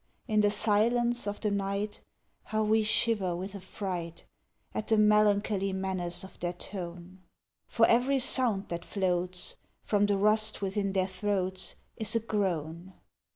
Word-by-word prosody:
In 215 -3 +3
the 205 - +4
silence 235 +3 +2
of 205 - -4
the 210 - 0
night, 200 +1 -2 0.4
How 220 0 0
we 220 +1 +3
shiver 210 -4 +2
with 190 +3 -5
affright 180 -3 -5 0.5
At 215 - -3
the 220 - +3
melancholy 210 -2 +3
menace 190 -2 -2
of 190 - -12
their 175 0 -2
tone! 180 0 -8 0.5
For 225 - +4
every 250 +5 +3
sound 245 -6 +1
that 170 0 -4
floats 180 -2 -2 0.3
From 205 -1 +2
the 200 -1 +2
rust 215 +2 +2
within 195 0 -1
their 190 -1 +2
throats 190 -1 -2 0.2
Is 220 -1 -1
a - - +4
groan. 185 -5 -2
200 Hz, 145 wpm, -29 LUFS, 185-215 Hz, 0.5 s, the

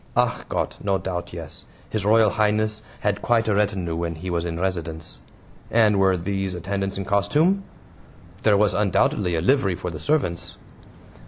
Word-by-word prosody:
"ACH - - +1
GOTT! - - -2
no 100 -1 +2
doubt, 90 -1 -4
yes; 85 -3 -8 0.3
His 110 -3 -1
Royal 110 -1 +5
Highness 110 0 +1 0.2
had 105 -1 0
quite 115 -2 +2
a 105 - +2
retinue 100 -5 0
when 85 0 -2
he 90 +3 -5
was 85 0 -1
in 85 -1 -3
residence." 85 -4 -4 0.5
"And 110 -3 +4
were 95 -1 +4
these 95 +1 -2
attendants 95 +3 -3
in 95 - -3
costume?" 150 - +2 0.8
"There 105 -2 +4
was 105 0 +3
undoubtedly 95 -3 +1
a 80 - 0
livery 100 - +2
for 90 - -5
the 80 - -7
servants." 90 - -1
95 Hz, 165 wpm, -23 LUFS, 85-105 Hz, 0.8 s, Royal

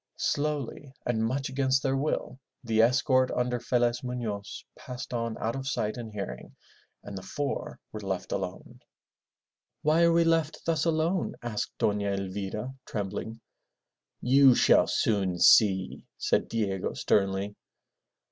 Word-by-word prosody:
Slowly 145 -2 -2
and 110 -2 0
much 130 +4 -1
against 135 0 +1
their 135 0 +1
will, 135 -1 -2 0.2
the 110 -2 +2
escort 130 +2 +3
under 125 0 -1
Felez 120 0 +1
Mufioz 110 -5 -5
passed 125 0 -8
on 115 -1 -2
out 115 +3 -2
of 135 0 -5
sight 110 -5 -1
and 115 -3 -7
hearing, 100 - -7 0.5
and 100 - -8
the 95 - -5
four 145 +7 -4
were 110 - -6
left 95 -2 -4
alone. 95 -2 -5 1.0
"Why 155 +2 +3
are 170 - +5
we 170 0 +4
left 165 -2 0
thus 160 -2 +1
alone?" 165 +3 0
asked 115 -3 -3
Dona 105 -1 +1
Elvira 100 +5 -4
trembling. 105 +2 -4 0.8
"You 130 0 +6
shall - - +5
soon 95 -5 +1
see," 95 +2 +4
said - - +1
Diego 100 -4 -1
sternly. 100 0 +1
120 Hz, 135 wpm, -28 LUFS, 100-135 Hz, 1.0 s, You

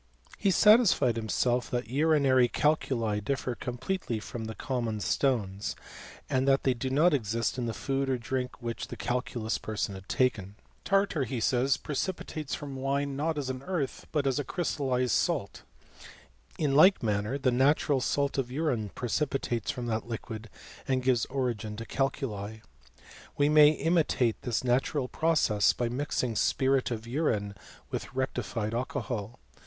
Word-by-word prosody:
He 200 - +2
satisfied 190 - +5
himself 120 +2 0
that 120 -2 -2
urinary 140 -3 +4
calculi 120 -7 +1
differ 130 +2 -2
completely 125 - -3
from 110 +1 -6
common 120 -5 -2
stones, 105 -5 0 0.5
and 130 +1 0
that 135 0 +4
they 130 - +3
do 125 +2 -3
not 155 +6 +4
exist 115 -1 -1
in 120 - -1
the 115 - -2
food 135 -1 -1
or 130 - +1
drink 125 +2 -3
which 120 -1 -4
the - - -8
calculous 120 -2 -2
person 105 -2 -3
had 95 0 -11
taken. 105 -6 0 0.3
Tartar, 195 -8 +1
he 125 +1 -3
says, 130 +4 +2
preci 155 +6 -2
Etates 155 -4 -5
from 140 -2 -7
wine, 140 +1 -1
not 155 +3 -1
as 135 -3 -2
an 130 0 -6
earth, 160 -4 -3
but 145 -3 0
as 135 +1 +1
a - - -1
crystal 140 -5 -1
Jed 125 -1 +1
salt. - - 0 1.0
In 145 -3 +1
like 185 +5 +6
manner, 105 +4 0
the 135 -2 +1
natural 135 +2 +3
salt 140 +3 0
of 125 -2 -2
urine 130 -7 -1
precipitates 125 -2 -1
from 125 -4 -3
that 115 0 -2
liquid, 115 -1 -6 0.4
and 130 -1 +1
gives 125 -3 +2
origin 120 -5 -2
to 115 - -6
cal 135 +2 +1
cSL 110 -6 -6 0.8
We 145 0 +3
may 150 -1 +8
imitate 155 -7 +1
this 120 -1 -1
natural 125 +2 +1
process 150 -10 +2
by 120 -1 -1
mixing 125 -2 -2
spirit 135 +2 +2
of 115 -2 -4
urine 115 -6 -1 0.4
with - - -5
rectified 120 -4 -2
alcohol. 120 -3 -3
130 Hz, 155 wpm, -29 LUFS, 115-140 Hz, 1.0 s, may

